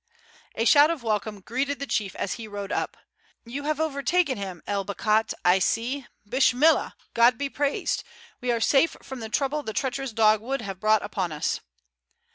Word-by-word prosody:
A 225 - 0
shout 290 +4 +7
of 330 -7 -3
welcome 215 -2 -2
greeted 275 +7 -2
the 280 - -4
chief 205 -8 -2
as 190 - -2
he 230 -2 -7
rode 205 -1 -6
up. - - -2 0.5
"You 275 +5 -6
have 305 0 -1
overtaken 300 0 +1
him, 190 -4 -6
El 200 -1 -1
Bakhat, 215 +3 +1
I 180 +2 +5
see; 240 +7 -1 0.2
Bishmillah, 260 +6 +3 0.2
God 235 +1 +5
be 280 0 -2
praised, 285 +1 -1 0.4
we 250 -1 0
are 235 - +1
safe 275 +7 +3
from 265 -1 -7
the 220 -1 -6
trouble 280 +5 0
the 220 -6 -5
treacherous 270 +3 -2
dog 215 -1 +4
would 265 +2 -3
have 195 -2 -6
brought 215 +1 +3
upon 190 -4 -2
us!" 150 - -1
235 Hz, 180 wpm, -26 LUFS, 210-275 Hz, 0.5 s, shout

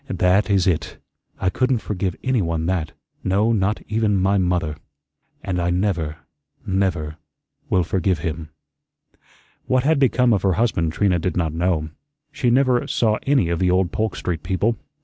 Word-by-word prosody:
That 95 +3 +2
is 95 -2 +3
it. 90 -5 -1 0.4
I 95 - +1
couldn't 130 +2 +1
forgive 95 -4 -3
anyone 85 -11 0
that 85 -4 -1 0.3
no, 100 +4 +2
not 105 -1 0
even 110 -2 +1
my 95 +2 +2
MOTHER. 90 -4 0 0.7
And 90 -2 -2
I 85 - 0
never 90 -4 -1 0.5
never 90 -5 -1 0.5
will 90 - +3
forgive 90 +1 0
him." 80 0 -4 1.2
What 130 -1 +2
had 155 +1 +2
become 125 -3 +3
of 100 - +1
her 95 -1 +2
husband 85 -6 +1
Trina 90 0 +1
did 90 +1 -2
not 80 -3 0
know. 85 -2 0 0.4
She 125 - 0
never 125 0 +3
saw 110 -2 +1
any 135 -11 +3
of 85 -1 -1
the 90 - +2
old 90 0 +2
Polk 110 0 -1
Street 85 -4 -3
people. 100 +6 0
95 Hz, 160 wpm, -22 LUFS, 85-110 Hz, 1.2 s, is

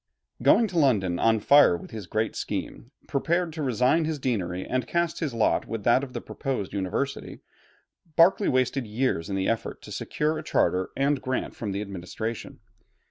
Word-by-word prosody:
Going 230 - +5
to 175 -2 0
London 95 - +2
on 115 -1 +3
fire 140 -5 +6
with - - -12
his 105 -5 -7
great 110 +3 -1
scheme, - - -5 0.2
prepared 170 +4 0
to 160 - -5
resign 130 +5 +2
his 155 -1 -2
deanery 95 -9 -2
and 130 -1 -2
cast 170 -1 -1
in 160 - +1
his 135 - -7
lot 115 - +1
with 115 -2 -4
that 125 +5 +4
of 130 -2 -7
the - - -4
proposed 130 -9 -4
University, 100 +8 -3 0.7
Berkeley 180 +4 +5
wasted 130 -1 0
years 105 -5 -1
in 95 - -2
the 95 0 0
effort 115 0 -2
to - - -10
secure 155 +1 -1
a - - -7
charter 95 - +1
and 140 0 +1
grant 130 0 -3
from 105 -4 -4
the 100 +1 -2
administration. 105 +4 -6
125 Hz, 185 wpm, -26 LUFS, 105-145 Hz, 0.7 s, fire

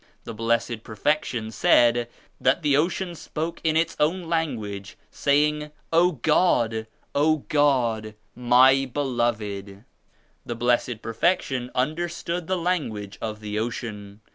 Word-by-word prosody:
The 115 - -7
Blessed 115 0 -1
Perfection 115 -1 -1
said 120 +1 +3 0.3
that 130 +6 +2
the 145 -2 +3
ocean 175 +4 0
spoke 165 0 -5
in 160 -1 +2
its 165 0 +1
own 170 +5 +1
language 115 -12 -3
saying 150 +1 +1 0.2
*0 175 +2 +4
God 150 -8 +3
I 110 0 -3 0.3
O 150 +1 +2
God! 120 -7 +1 0.2
My 130 +2 +5
Beloved!' 110 -7 -2 0.6
The 120 - -5
Blessed 120 -1 0
Perfection 125 0 0
understood 170 +5 -2
the 185 - 0
language 115 - -2
of 110 -1 -4
the 105 0 -3
ocean. 110 -3 -5
125 Hz, 120 wpm, -25 LUFS, 110-155 Hz, 0.6 s, My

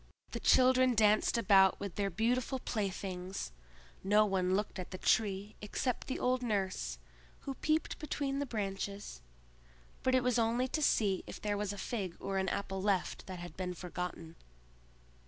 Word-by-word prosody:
The - - -3
children 255 -1 +5
danced 215 +2 +4
about 195 -4 +5
with 200 -3 -4
their 200 +1 -1
beautiful 240 - 0
playthings; 190 - -3 0.5
no 210 +2 +5
one 190 -2 +1
looked 205 -1 -2
at 180 - -5
the 185 - -6
Tree 200 +1 +1
except 230 +4 -2
the 260 - -2
old 255 0 +1
nurse, 190 - -1 0.4
who 275 - -4
peeped 310 +3 0
between 280 -2 -2
the 285 - -2
branches; 200 - -4 0.8
but 260 0 +2
it 255 - +3
was 245 -1 +2
only 235 +3 +2
to 310 - -1
see 205 -9 +2
if - - -7
there 205 -1 -1
was 205 -1 -2
a 205 - -6
fig 195 -5 -3
or 195 0 -1
an 190 -1 0
apple 195 -1 -3
left 195 -2 0
that 185 -1 -6
had 175 -2 -8
been 180 -1 -3
forgotten. 175 -2 -6
205 Hz, 165 wpm, -33 LUFS, 190-245 Hz, 0.8 s, children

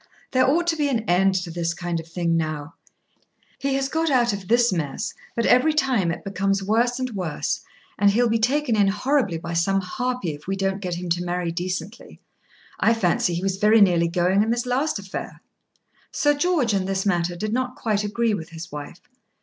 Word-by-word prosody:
There 255 0 +3
ought 340 +5 +2
to 340 -1 +1
be 295 -2 0
an 240 -4 0
end 190 +2 +3
to 170 - -7
this 170 0 -2
kind 175 -1 -3
of 165 - -9
thing 170 0 -1
now. 155 -1 -3 0.9
He 275 0 0
has 270 0 0
got 320 +3 0
out 240 -5 +3
of 195 -2 -6
this 240 -2 +3
mess, 165 +6 -3 0.2
but 235 - 0
every 290 +6 +4
time 255 - +2
it 165 - -4
becomes 195 0 -1
worse 235 +4 +1
and 255 -1 -3
worse, 175 -8 -2 0.4
and 205 0 +5
he'll 235 +4 +3
be 225 0 +1
taken 255 +1 +1
in 205 -2 +4
horribly 210 - +1
by 170 +1 -6
some 195 +4 +2
harpy 245 0 -3
if 145 +2 -12
we 195 - -1
don't 195 0 -1
get 180 -3 -3
him 180 +1 -5
to 175 +1 0
marry 175 -1 -2
decently. 180 +4 -5 0.6
I 230 - +4
fancy 175 -4 +1
he 175 - -3
was 195 -1 -1
very 215 +3 +5
nearly 175 -4 +4
going 180 +3 +2
in 220 - +1
this 240 +1 0
last 265 +4 0
affair." 195 -1 -7 0.7
Sir 290 0 +2
George, 290 -7 +1
in 195 -2 0
this 190 0 -1
matter, 175 -3 0
did 215 +5 -3
not 255 0 -1
quite 210 -2 -1
agree 225 +2 0
with 165 -6 -4
his 165 0 -9
wife. 150 +3 -8
195 Hz, 205 wpm, -23 LUFS, 175-240 Hz, 0.9 s, and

